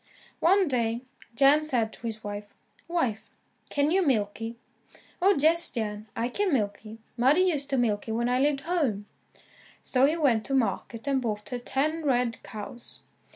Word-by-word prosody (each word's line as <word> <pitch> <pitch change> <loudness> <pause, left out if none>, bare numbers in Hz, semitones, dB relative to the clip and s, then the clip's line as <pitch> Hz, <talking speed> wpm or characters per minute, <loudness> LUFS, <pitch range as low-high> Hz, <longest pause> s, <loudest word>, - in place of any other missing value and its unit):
One 380 +2 +4
day, 235 -3 0 0.3
Jan 280 +4 +5
said 240 -7 0
to 235 - -7
his 220 -1 -5
wife, 205 0 -5 0.4
"Wife 260 -11 -1 0.4
can 290 +1 +1
you 380 +2 +3
milk 215 -9 0
y?" 225 +1 -4 0.7
"Oh, 395 +2 +5
yes, 325 +4 +3
Jan, 215 -2 -4
I 230 - 0
can 395 +9 -1
milk 210 -7 0
y. 220 0 -10 0.2
Mother 265 +6 +4
used 320 -7 +1
to 270 - +1
milk 215 -4 +1
y, - - -3
when 235 +2 0
I 250 +1 +2
lived 280 0 +2
home." 280 - -1 0.8
So 260 +1 +4
he 315 +3 0
went 250 -9 +2
to 270 - 0
market 235 -1 -1
and 270 -1 +2
bought 210 -3 -3
her 245 - -3
ten 305 +6 -1
red 245 -4 +1
cows. 220 +3 -9
250 Hz, 175 wpm, -27 LUFS, 225-295 Hz, 0.8 s, Jan